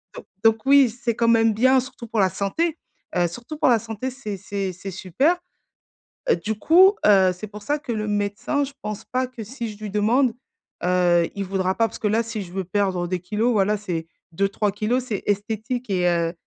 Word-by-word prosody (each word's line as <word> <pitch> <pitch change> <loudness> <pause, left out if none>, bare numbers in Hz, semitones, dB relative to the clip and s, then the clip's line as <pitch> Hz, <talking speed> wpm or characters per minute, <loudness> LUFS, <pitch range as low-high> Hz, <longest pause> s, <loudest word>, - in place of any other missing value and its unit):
don - - -9 0.2
donc 225 +1 +3
oui 275 -2 +6
c'est 240 0 -3
quand 230 - +1
même 225 -1 +4
bien 260 +5 +4
surtout 255 -2 -8
pour 225 -1 -2
la 190 - +4
santé, 300 - -1 0.4
heu, 175 -1 +3
surtout 240 - -8
pour - - +4
la 240 - +5
santé 225 +3 -5
c'est 215 -7 -6
c'est 195 -1 -4
c'est 195 +2 -7
super. 195 - +1 1.1
Du 220 0 -1
coup, 370 - +6
heu, 190 -3 +6
c'est 185 +4 -8
pour 210 0 -11
ça 295 +7 -1
que 290 - -6
le 215 -1 -2
médecin 205 +7 -1
je 275 - -10
pense 215 +1 -5
pas 255 +1 -1
que 250 -3 -9
si 235 +1 -5
je 210 - -12
lui 215 -1 -5
demande, 230 +5 +2 0.5
heu, 180 -1 +3
il 200 -1 -3
voudra 190 0 0
pas, 225 -1 +2
parce - - -10
que 215 - 0
là 220 +2 +2
si 225 -1 -5
je 175 - -12
veux 190 -1 -3
perdre 185 -2 0
des 180 0 -2
kilogrammes, 215 +7 0
voilà 210 0 +2
c'est 175 -5 -4 0.3
2-3 200 +3 0
kilogrammes 235 +5 0
c'est 205 -5 -3
esthétique 220 +4 -2
et 180 -2 +1
heu, 170 -1 0
215 Hz, 210 wpm, -23 LUFS, 195-240 Hz, 1.1 s, oui